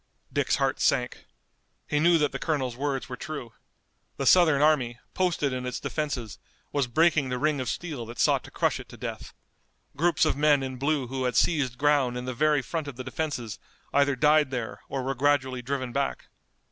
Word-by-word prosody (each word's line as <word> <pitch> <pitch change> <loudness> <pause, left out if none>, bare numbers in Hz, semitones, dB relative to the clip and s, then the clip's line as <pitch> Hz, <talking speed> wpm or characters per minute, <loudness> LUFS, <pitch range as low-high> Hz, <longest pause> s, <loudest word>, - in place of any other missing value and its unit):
Dick's - - +1
heart - - 0
sank. - - +1 0.6
He 150 - +1
knew 170 +2 +5
that 150 -3 +1
the 135 - -5
colonel's 135 -7 -1
words 135 0 -2
were 125 - -5
true. 125 -4 -7 0.6
The 135 - -2
Southern 160 -3 +6
army, 135 -6 +2 0.2
posted 170 -7 0
in 125 0 -3
its 125 0 -3
defenses, 140 - -4 0.3
was 140 -3 0
breaking 155 +1 +3
the 125 - -1
ring 150 0 +1
of 130 - -3
steel 145 -10 -4
that 120 +1 -9
sought - - +3
to - - -11
crush - - 0
it - - -11
to - - -11
death. - - -6 0.6
Groups 165 +2 +2
of - - +1
men 145 -1 +3
in 130 -1 -5
blue 140 0 0
who 130 +1 -3
had 125 -2 -1
seized 135 -7 +2
ground 145 -4 +2
in 125 - -5
the 130 - -3
very 150 +1 +2
front 155 +5 -4
of 140 - -6
the 130 - -6
defenses 130 -6 -4 0.3
either 140 0 +3
died 150 +2 +4
there 125 -4 -4
or 135 -2 -3
were 135 +1 -1
gradually 130 -2 +1
driven 130 0 -3
back. 140 +2 -2
140 Hz, 195 wpm, -27 LUFS, 125-150 Hz, 0.6 s, Southern